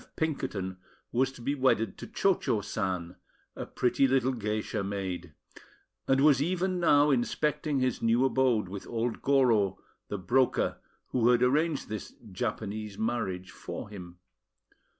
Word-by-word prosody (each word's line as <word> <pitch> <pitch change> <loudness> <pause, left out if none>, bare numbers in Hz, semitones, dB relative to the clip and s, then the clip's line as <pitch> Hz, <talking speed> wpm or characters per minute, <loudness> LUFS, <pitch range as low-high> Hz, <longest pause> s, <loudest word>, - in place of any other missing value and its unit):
F. - - -23
Pinkerton, 100 - -2 0.3
was 130 +2 +2
to 120 - -12
be 140 - 0
wedded 130 -7 +1
to - - -7
Cho 195 -3 +2
Cho 120 - -1
San, 95 -4 -3 0.4
a - - -6
pretty 125 +2 +2
little 130 0 +2
geisha 105 -2 -2
maid, 95 -4 -4 0.7
and 135 0 +3
was 140 -2 +5
even 180 +3 0
now 145 -3 +5
inspecting 145 +3 0
his 130 -2 0
new 115 +3 +3
abode 125 -6 +2
with 95 +1 -7
old 115 0 -2
Goro, 120 -8 +3 0.3
the 105 - -3
broker, 125 +8 +1 0.3
who 120 -2 +2
had 125 0 +4
arranged 150 +4 +1
this 110 -1 -6 0.2
"Japanese 105 -1 -4
Marriage" 105 -5 -2
for - - -7
him. 90 -4 -10
120 Hz, 145 wpm, -29 LUFS, 100-135 Hz, 0.7 s, was